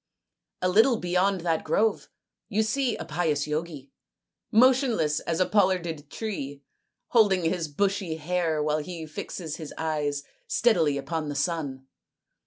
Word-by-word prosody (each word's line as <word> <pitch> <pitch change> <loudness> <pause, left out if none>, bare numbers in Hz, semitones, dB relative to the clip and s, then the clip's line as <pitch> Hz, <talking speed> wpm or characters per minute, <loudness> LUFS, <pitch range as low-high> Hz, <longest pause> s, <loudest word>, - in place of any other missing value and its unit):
" - - -59
A - - +4
little 220 +6 +5
beyond 180 0 +1
that 165 -2 0
grove 220 0 +1 0.4
you 220 0 +2
see 245 +2 0
a - - -6
pious 155 -3 0
Yogi, 150 -2 -4 0.6
motionless 240 - +4
as 165 -1 -2
a 185 - +4
pollarded 175 -8 +1
tree, 145 -11 -5 0.5
holding 205 -6 +4
his 165 0 0
bushy 190 +2 -1
hair 160 -1 0
while 150 0 +1
he 165 +1 -6
fixes 155 +1 -6
his 155 -3 -7
eyes 150 -3 -1 0.2
steadily 165 -12 +3
upon 155 +2 -3
the 145 - -4
sun. 145 -4 -2
170 Hz, 140 wpm, -27 LUFS, 150-200 Hz, 0.6 s, little